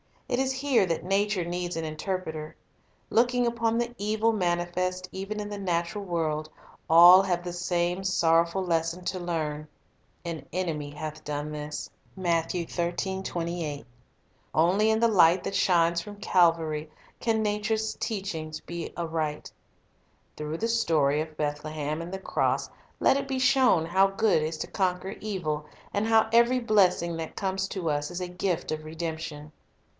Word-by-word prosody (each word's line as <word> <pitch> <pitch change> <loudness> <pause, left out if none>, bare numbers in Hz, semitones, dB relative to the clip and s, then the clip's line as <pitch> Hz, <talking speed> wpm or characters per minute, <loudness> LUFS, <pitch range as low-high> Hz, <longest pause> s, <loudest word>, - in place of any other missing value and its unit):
It 245 - 0
is 265 0 +1
here 265 -5 +2
that 165 -2 -1
nature 195 0 +1
needs 175 0 -3
an 165 - -2
interpreter. 160 -1 -4 0.5
Looking 245 +1 +3
upon 230 -1 0
the 240 0 -1
evil 215 +2 +1
manifest 180 -1 -1
even 195 +3 -4
in 205 - -5
the 205 -1 -5
natural 180 +2 -2
world, 155 -3 -1 0.4
all 175 +3 +9
have 175 -3 -1
the 175 -1 -5
same 175 +1 -1
sorrowful 170 0 +2
lesson 170 0 -1
to 185 - -2
learn, 155 -3 -3 0.3
— - - -39
"An 160 -5 -5
enemy 160 -5 -2
hath 155 +1 -7
done 150 0 -4
this." 150 0 -5 0.3
1 190 -1 -7 2.3
Only 185 +7 +4
in 220 0 +3
the 235 - +6
light 180 -4 +5
that - - -3
shines 170 -3 +3
from 205 +2 -9
Calvary 165 -5 +2 0.3
can 220 -2 +1
nature's 215 +1 -1
teaching 185 -8 -3
be 170 -1 -5
read - - -9
aright. 160 -3 -3 0.9
Through 150 +2 -4
the 230 - 0
story 155 -10 +2
of 155 -1 -7
Bethlehem 150 +1 -3
and 170 +1 -7
the 190 - -3
cross - - 0 0.3
let 270 - +4
it 275 0 -3
be 265 -1 -2
shown 255 -9 +4
how 190 +4 +4
good 195 -3 +2
is 155 +1 -2
to - - -3
conquer 185 0 -1
evil, 160 -8 -3 0.3
and 205 +2 0
how 225 -1 +4
every 235 +2 +5
blessing 185 -7 +2
that 160 -1 -6
comes 190 0 -1
to 185 -4 -3
us 145 0 -1
is 175 +1 -5
a 180 - -3
gift 180 -2 -2
of 155 0 -4
redemption. 160 -2 -5
175 Hz, 155 wpm, -27 LUFS, 160-205 Hz, 2.3 s, all